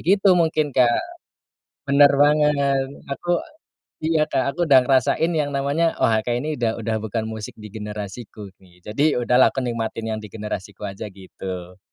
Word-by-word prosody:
gitu 195 +1 +4
mungkin 155 -3 +1
Kak. 120 -2 +4 0.9
Benar 140 0 +7
banget 145 -2 +3 0.2
aku 175 +5 0 0.7
iya 155 -1 +2
Kak, 135 -1 0
aku - - -5
udah 135 -2 +8
ngerasain 135 +6 +2
yang 150 -3 0
namanya 145 +4 0
wah 110 -1 +3
kayaknya 120 +7 -2
ini - - -9
udah 115 -2 +1
udah 110 -1 0
bukan 110 +1 -2
musik 110 -1 -6
di 105 -1 -10
generasiku, 105 -1 -7
gi 90 -1 -22
jadi 110 +7 -1 0.2
udahlah 125 +2 +5
aku 135 - -2
nikmatin 115 -2 -3
yang 110 - -3
di 105 - -9
generasiku 105 -1 -6
aja 100 +2 -6
gitu. 95 -1 -8
120 Hz, 160 wpm, -22 LUFS, 105-145 Hz, 0.9 s, udah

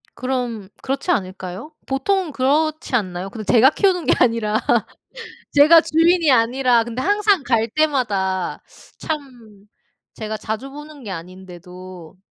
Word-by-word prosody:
그럼 245 -5 -3
그렇지 275 +6 -3
않을까요? 185 - -4
보통은 325 +6 -1
그렇지 295 +2 0
않나요? 190 -4 -2
근데 215 0 -7
제가 250 +3 +6
키우는 360 -2 +1
게 - - +4
아니라 225 -3 +2 0.9
제가 305 +3 +7
주인이 330 0 +2
아니라 245 0 +3
근데 235 +2 -5
항상 410 +1 +2
갈 230 -4 +1
때마다 210 - -1 0.4
참 245 -10 -7 0.5
제가 215 -1 -5
자주 220 +5 -5
보는 295 0 -11
게 210 - -8
아닌데도 180 0 -10
245 Hz, 280 characters per minute, -20 LUFS, 200-295 Hz, 0.9 s, 제가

